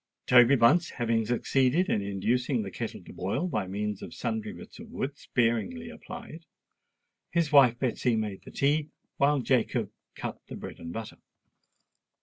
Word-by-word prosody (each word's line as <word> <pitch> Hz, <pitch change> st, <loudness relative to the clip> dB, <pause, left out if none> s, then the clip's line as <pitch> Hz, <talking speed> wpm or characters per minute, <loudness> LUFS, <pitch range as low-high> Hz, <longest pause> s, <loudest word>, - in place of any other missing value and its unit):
Toby 125 Hz, +2 st, +7 dB
Bunce, 145 Hz, +8 st, +4 dB
having 115 Hz, -3 st, 0 dB
succeeded 130 Hz, +7 st, +2 dB
in 105 Hz, -, +1 dB
inducing 110 Hz, +5 st, 0 dB
the 95 Hz, -, -6 dB
kettle -, -, -5 dB
to -, -, -12 dB
boil 100 Hz, -, -1 dB
by 95 Hz, -, -2 dB
means 105 Hz, +1 st, -3 dB
of -, -, -8 dB
sundry 220 Hz, -1 st, -3 dB
bits 215 Hz, +1 st, -12 dB
of 225 Hz, 0 st, -10 dB
wood 145 Hz, -, -3 dB
sparingly 135 Hz, -, -1 dB
applied, 200 Hz, -12 st, -10 dB, 0.8 s
his 165 Hz, -3 st, +1 dB
wife 130 Hz, -5 st, +7 dB
Betsy 125 Hz, -1 st, 0 dB
made 105 Hz, -3 st, -3 dB
the -, -, -11 dB
tea, 145 Hz, +2 st, +1 dB, 0.3 s
while 140 Hz, 0 st, +3 dB
Jacob 125 Hz, -2 st, +1 dB, 0.2 s
cut -, -, -5 dB
the -, -, -7 dB
bread -, -, -8 dB
and 85 Hz, 0 st, -7 dB
butter. 110 Hz, +3 st, -6 dB
125 Hz, 155 wpm, -28 LUFS, 110-155 Hz, 0.8 s, Toby